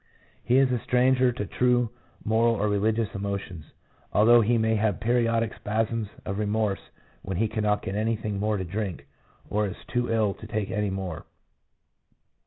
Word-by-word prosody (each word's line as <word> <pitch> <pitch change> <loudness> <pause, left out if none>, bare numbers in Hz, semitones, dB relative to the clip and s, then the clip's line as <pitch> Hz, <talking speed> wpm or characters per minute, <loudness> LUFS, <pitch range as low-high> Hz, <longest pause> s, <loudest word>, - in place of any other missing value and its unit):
He 125 +2 +3
is 135 -1 +4
a 125 - +1
stranger 125 +1 +3
to 115 -4 -4
true 125 +1 +1 0.3
moral 115 +2 +3
or 105 0 0
religious 105 +1 0
emotions, 100 -5 -4 0.5
although 120 +3 +6
he 115 +2 +2
may 110 0 +2
have 105 -2 0
periodic 115 -1 +1
spasms 110 +1 -1 0.2
of 95 +2 -3
remorse 105 -1 0 0.4
when 95 -2 -4
he 110 +3 +2
cannot 105 -1 0
get 95 - -4
anything 105 -1 -1
more 105 +1 0
to 95 - -3
drink, 95 -4 -4 0.4
or 105 0 0
is 95 - -6
too 120 -1 0
ill 110 -3 +2
to 110 - -11
take 105 -2 -2
any 105 0 0
more. 95 -4 -5
110 Hz, 165 wpm, -26 LUFS, 100-115 Hz, 0.5 s, although